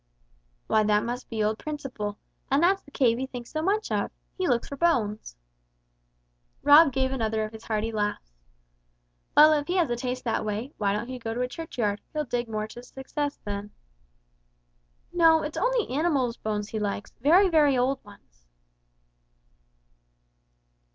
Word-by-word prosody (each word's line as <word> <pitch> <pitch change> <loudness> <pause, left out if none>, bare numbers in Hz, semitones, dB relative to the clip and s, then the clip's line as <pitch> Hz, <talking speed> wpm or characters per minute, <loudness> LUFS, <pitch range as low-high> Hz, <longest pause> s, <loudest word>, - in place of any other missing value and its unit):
"Why 220 - +3
that 210 0 +2
must 245 +1 -5
be 220 -2 -1
old 215 +1 0
Principle, 255 -9 -5 0.3
and 275 +4 +3
that's 385 +2 +3
the - - -18
cave 245 -4 +2
he 265 - -2
thinks 245 -2 -8
so 310 - -2
much 410 +6 0
of! - - 0 0.3
He 370 -1 -1
looks 240 -3 +1
for 280 - -6
bones." 220 - 0 1.3
Rob 290 +1 +8
gave 265 0 0
another 220 -4 -1
of 215 - -5
his 220 - -11
hearty 220 0 -1
laughs. 205 - -3 1.0
"Well, 305 +1 +9
if 290 -1 0
he 355 - -1
has 335 -9 +2
a - - +1
taste 250 +1 -4
that 225 -2 -1
way, 215 +7 -4
why 200 -2 +1
don't 210 +4 -2
he 255 0 -6
go 225 -1 -4
to 245 - -2
a 250 - 0
churchyard, 240 -8 -3
he'll 305 -1 -1
dig 245 -2 -2
to - - -11
more 215 0 -2
success 265 +5 -5
there." 205 0 -4 1.4
"No, 325 -2 +5
it's 300 - -5
only - - +1
animals' 275 -5 +1
bones 210 -1 -3
he 220 - -3
likes, 205 0 -3
very, 350 +9 +6
very 300 -6 +4
old 260 +2 0
ones." - - -19
250 Hz, 165 wpm, -26 LUFS, 215-295 Hz, 1.4 s, Well